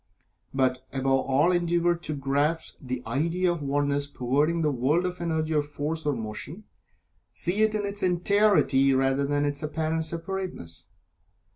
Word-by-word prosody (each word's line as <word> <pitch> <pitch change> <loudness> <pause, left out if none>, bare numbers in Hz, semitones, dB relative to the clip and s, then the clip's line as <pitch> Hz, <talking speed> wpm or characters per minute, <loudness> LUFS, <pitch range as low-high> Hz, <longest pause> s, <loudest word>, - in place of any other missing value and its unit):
But 130 -1 0
above 135 0 +1
all 145 +6 +3
endeavor 175 0 +2
to 165 -3 -5
grasp 145 +4 0
the 125 -1 -4
idea 165 +9 0
of 170 - -3
the 145 - -5
Oneness 145 0 0
pervading 145 +6 0
the 150 - +2
world 140 +7 +1
of 180 -1 -4
Energy 160 -2 -1
or 150 - +3
Force, 150 +2 -4
or 145 - +2
Motion. 115 - -6 0.7
See 185 +5 -1
it 220 0 +3
in 210 -1 -1
its 200 +1 -2
entirety, 175 -7 +3
rather 135 +1 +2
than 145 +1 0
in 145 - +2
its 145 0 -5
apparent 160 +1 -1
separateness. 170 - -5
150 Hz, 160 wpm, -26 LUFS, 135-175 Hz, 0.7 s, all